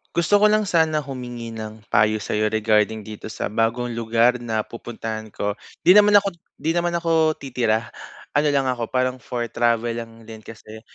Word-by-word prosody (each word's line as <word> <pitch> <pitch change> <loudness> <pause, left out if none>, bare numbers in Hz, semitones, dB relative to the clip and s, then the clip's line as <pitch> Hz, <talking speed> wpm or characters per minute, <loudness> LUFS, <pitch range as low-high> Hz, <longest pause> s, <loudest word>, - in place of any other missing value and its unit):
Gusto 185 +5 +3
ko 210 - +6
lang 215 0 +2
sana 160 -5 +1
humingi 120 -4 -7
ng 110 -1 -8
payo 105 +1 +2
sa'yo 105 +1 -1
regarding 110 0 +1
dito 110 0 -8
sa - - -4
bagong 115 +3 -1
lugar 115 +2 +2
na 110 -2 -2
pupuntahan 110 -2 -7
ko, 105 0 -3 0.3
'di 180 - +8
naman 205 0 +7
ako 200 -1 +1 0.2
'di 160 - -1
naman 175 0 0
ako 160 -2 +2
titira, 120 -4 -1 0.4
ano 150 +1 +3
lang 140 -2 +1
ako, 125 -3 -2
parang 130 0 -1
for 120 -1 -3
travel 120 0 +1
lang 115 -1 -8
din 110 -1 -10
kasi. 110 0 -12
120 Hz, 175 wpm, -22 LUFS, 110-150 Hz, 0.4 s, di